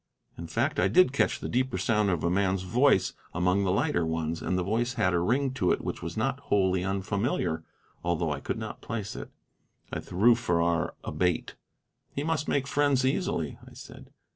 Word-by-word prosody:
In 85 Hz, -, -7 dB
fact, 120 Hz, -, 0 dB
I -, -, +4 dB
did 180 Hz, -7 st, +4 dB
catch 140 Hz, -, +1 dB
the -, -, -4 dB
deeper 130 Hz, 0 st, 0 dB
sound 105 Hz, -3 st, +2 dB
of 85 Hz, -4 st, 0 dB
a 85 Hz, -, +2 dB
man's 95 Hz, 0 st, +1 dB
voice 120 Hz, +2 st, +3 dB, 0.2 s
among 90 Hz, +3 st, +2 dB
the 95 Hz, -, +1 dB
lighter 130 Hz, -, +1 dB
tones, 80 Hz, 0 st, -2 dB
and 90 Hz, -, -1 dB
the 90 Hz, -, 0 dB
voice 120 Hz, +6 st, -1 dB
had 90 Hz, -6 st, +2 dB
a 85 Hz, -, +3 dB
ring 125 Hz, +9 st, +1 dB
to 90 Hz, -9 st, +1 dB
it -, -, +1 dB
which -, -, -4 dB
was 85 Hz, +3 st, -6 dB
not 135 Hz, +5 st, 0 dB
wholly 95 Hz, -8 st, +1 dB
unfamiliar, 95 Hz, -, -1 dB, 0.4 s
although 85 Hz, -2 st, 0 dB
I 70 Hz, -, -2 dB
could -, -, -3 dB
not -, -, -6 dB
place 110 Hz, -2 st, -4 dB
it. -, -, -7 dB, 0.6 s
I -, -, -1 dB
threw 110 Hz, +7 st, +4 dB
Farrar 85 Hz, -6 st, 0 dB
a -, -, -4 dB
bait. 90 Hz, -2 st, 0 dB, 0.6 s
"He 140 Hz, -, -1 dB
must 155 Hz, -2 st, -1 dB
make 140 Hz, -1 st, +1 dB
friends 140 Hz, -2 st, +2 dB
easily," 130 Hz, -, -1 dB
I -, -, -17 dB
said. -, -, -12 dB
100 Hz, 195 wpm, -28 LUFS, 90-130 Hz, 0.6 s, I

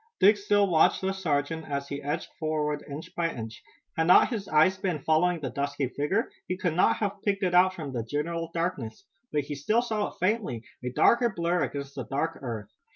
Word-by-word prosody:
Dick 210 Hz, +2 st, +7 dB
still 205 Hz, 0 st, +2 dB
watched 165 Hz, -4 st, +4 dB
the 190 Hz, 0 st, 0 dB
sergeant 160 Hz, -3 st, -2 dB
as 140 Hz, -1 st, -2 dB
he 140 Hz, 0 st, -4 dB
edged 150 Hz, +3 st, -3 dB
forward, 150 Hz, -2 st, -1 dB
inch 145 Hz, +3 st, -8 dB
by 165 Hz, -1 st, 0 dB
inch. 110 Hz, -4 st, -7 dB, 0.3 s
Had 160 Hz, 0 st, +1 dB
not 180 Hz, -, +7 dB
his 215 Hz, -5 st, -4 dB
eyes 155 Hz, +5 st, +4 dB
been 185 Hz, -4 st, -1 dB
following 165 Hz, +2 st, +2 dB
the 135 Hz, -5 st, -4 dB
dusky 140 Hz, 0 st, -2 dB
figure 150 Hz, -, -1 dB, 0.2 s
he 180 Hz, -, -2 dB
could 180 Hz, -3 st, 0 dB
not 180 Hz, -, +4 dB
have 205 Hz, -1 st, -3 dB
picked 200 Hz, -1 st, 0 dB
it 180 Hz, -1 st, +1 dB
out 185 Hz, +1 st, +5 dB
from 150 Hz, -6 st, -6 dB
the 120 Hz, -2 st, -2 dB
general 165 Hz, +6 st, -3 dB
darkness. 165 Hz, -10 st, -3 dB, 0.3 s
But 150 Hz, -, +1 dB
he 145 Hz, +1 st, -6 dB
still 215 Hz, -, +1 dB
saw 220 Hz, -3 st, -1 dB
it -, -, -12 dB
faintly, 185 Hz, -, 0 dB, 0.2 s
a 125 Hz, -, -1 dB
darker 235 Hz, -, +4 dB
blur 175 Hz, -3 st, 0 dB
against 140 Hz, -1 st, -6 dB
the 130 Hz, -4 st, -5 dB
dark 160 Hz, +4 st, -2 dB
earth. 110 Hz, -6 st, -5 dB
160 Hz, 210 wpm, -28 LUFS, 140-190 Hz, 0.3 s, Dick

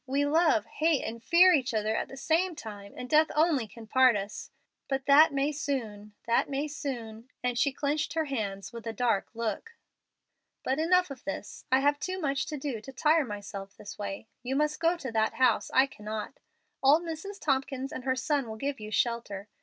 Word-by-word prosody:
We 280 Hz, +2 st, +1 dB
love, 305 Hz, -7 st, +3 dB
hate, 310 Hz, +4 st, +1 dB
and 230 Hz, +1 st, -5 dB
fear 360 Hz, +5 st, +6 dB
each 260 Hz, -6 st, +1 dB
other 215 Hz, +1 st, 0 dB
at -, -, -1 dB
the 270 Hz, -, -11 dB
same 330 Hz, +5 st, +1 dB
time, 205 Hz, -5 st, -9 dB
and 250 Hz, -, -6 dB
death 310 Hz, +3 st, +4 dB
only 305 Hz, -7 st, +2 dB
can 225 Hz, +3 st, -12 dB
part 255 Hz, +1 st, +5 dB
us. 200 Hz, 0 st, -5 dB, 0.4 s
But 270 Hz, -1 st, -2 dB
that 290 Hz, +3 st, +7 dB
may 280 Hz, +1 st, +1 dB
soon 225 Hz, -8 st, -4 dB
that 235 Hz, 0 st, +2 dB
may 280 Hz, +2 st, -1 dB
soon;" 240 Hz, -6 st, -6 dB
and 250 Hz, -1 st, 0 dB
she 280 Hz, +3 st, +2 dB
clenched 295 Hz, +3 st, -1 dB
her 320 Hz, -1 st, 0 dB
hands 215 Hz, -5 st, -4 dB
with 230 Hz, -1 st, -8 dB
a 225 Hz, -, -3 dB
dark 225 Hz, -3 st, +1 dB
look. 235 Hz, -, -4 dB, 0.9 s
"But 265 Hz, +3 st, 0 dB
enough 360 Hz, 0 st, +3 dB
of 265 Hz, -, -9 dB
this. 195 Hz, +1 st, -6 dB
I 260 Hz, +1 st, +5 dB
have 290 Hz, +1 st, +2 dB
too 370 Hz, +3 st, -3 dB
much 280 Hz, -5 st, -1 dB
to 305 Hz, -, -4 dB
do 265 Hz, -6 st, -4 dB
to 270 Hz, -, -10 dB
tire 305 Hz, +3 st, +3 dB
myself 200 Hz, -2 st, -7 dB
this 205 Hz, -, -10 dB
way. 200 Hz, +1 st, -5 dB
You 255 Hz, +2 st, -3 dB
must 300 Hz, +1 st, +1 dB
go 335 Hz, +1 st, +2 dB
to 265 Hz, -7 st, -6 dB
that 220 Hz, -1 st, +1 dB
house; 250 Hz, -4 st, +3 dB
I 265 Hz, -, +5 dB
cannot. 215 Hz, -1 st, -7 dB, 0.4 s
Old 290 Hz, +5 st, +5 dB
Mrs. 345 Hz, +5 st, -6 dB
Tompkins 270 Hz, -2 st, -1 dB
and 255 Hz, -, -6 dB
her 260 Hz, 0 st, +1 dB
son 280 Hz, -1 st, 0 dB
will 220 Hz, -, -5 dB
give 275 Hz, +3 st, -3 dB
you 215 Hz, 0 st, -7 dB
shelter. 215 Hz, -3 st, -1 dB
265 Hz, 200 wpm, -29 LUFS, 220-300 Hz, 0.9 s, that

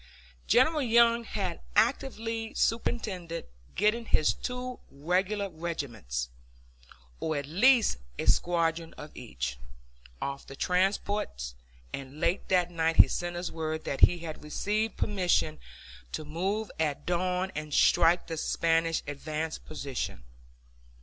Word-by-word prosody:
General 300 Hz, +5 st, +4 dB
Young 235 Hz, -1 st, +4 dB
had 185 Hz, -6 st, -3 dB
actively 225 Hz, -1 st, 0 dB
superintended 190 Hz, -7 st, -1 dB, 0.3 s
getting 215 Hz, +4 st, +2 dB
his 155 Hz, -, +3 dB
two 250 Hz, 0 st, -5 dB
regular 185 Hz, +8 st, 0 dB
regiments, 120 Hz, -, -4 dB, 0.9 s
or 160 Hz, -2 st, -1 dB
at 140 Hz, -, -3 dB
least 220 Hz, -, +4 dB, 0.2 s
a -, -, -2 dB
squadron 165 Hz, -1 st, +1 dB
of 150 Hz, +1 st, -10 dB
each, -, -, -5 dB, 0.6 s
off 140 Hz, 0 st, -4 dB
the 135 Hz, -, -9 dB
transports, 185 Hz, -, 0 dB, 0.4 s
and 140 Hz, +2 st, -7 dB
late 170 Hz, +3 st, 0 dB
that 180 Hz, -2 st, +3 dB
night 165 Hz, -1 st, +1 dB
he -, -, +9 dB
sent 175 Hz, 0 st, -3 dB
us 175 Hz, 0 st, -3 dB
word 160 Hz, -1 st, -3 dB
that 135 Hz, -, -3 dB
he 175 Hz, -, +7 dB
had 165 Hz, -3 st, -7 dB
received 210 Hz, +8 st, -1 dB
permission 180 Hz, -6 st, +1 dB, 0.5 s
to 155 Hz, -, -4 dB
move 195 Hz, +8 st, -2 dB
at 150 Hz, -3 st, -1 dB
dawn 180 Hz, +1 st, 0 dB
and 155 Hz, 0 st, -5 dB
strike 170 Hz, +3 st, +4 dB
the 165 Hz, -, -5 dB
Spanish 165 Hz, +1 st, +1 dB
advance 155 Hz, +2 st, -4 dB
position. 140 Hz, -, -5 dB
170 Hz, 125 wpm, -29 LUFS, 155-210 Hz, 0.9 s, he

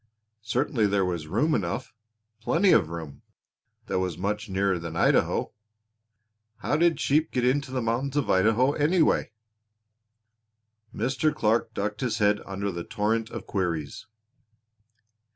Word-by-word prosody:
Certainly 120 Hz, +1 st, 0 dB
there 100 Hz, -1 st, +1 dB
was 85 Hz, -4 st, -3 dB
room 120 Hz, -, +1 dB
enough, 115 Hz, +4 st, -2 dB, 0.5 s
plenty 170 Hz, -, +2 dB
of 80 Hz, -, +4 dB
room, 80 Hz, -4 st, -7 dB, 0.6 s
that -, -, -1 dB
was 90 Hz, -3 st, -2 dB
much 105 Hz, +4 st, -3 dB
nearer 95 Hz, -1 st, 0 dB
than 85 Hz, 0 st, -6 dB
Idaho. -, -, +2 dB, 1.1 s
How 110 Hz, -, -1 dB
did 170 Hz, +1 st, +2 dB
sheep 155 Hz, +3 st, +2 dB
get 125 Hz, -1 st, -1 dB
into 140 Hz, +2 st, +1 dB
the 130 Hz, -2 st, -2 dB
mountains 130 Hz, +5 st, -1 dB
of 140 Hz, -7 st, +1 dB
Idaho 110 Hz, +8 st, +3 dB
anyway? 155 Hz, +4 st, +2 dB, 1.6 s
Mr. 130 Hz, +6 st, 0 dB
Clark 110 Hz, -2 st, 0 dB
ducked 105 Hz, +1 st, -3 dB
his 120 Hz, -4 st, -1 dB
head 105 Hz, -1 st, +2 dB
under 100 Hz, +1 st, -3 dB
the 85 Hz, -1 st, -5 dB
torrent 110 Hz, +4 st, -1 dB
of -, -, -7 dB
queries. 85 Hz, -1 st, -3 dB
110 Hz, 135 wpm, -26 LUFS, 95-130 Hz, 1.6 s, of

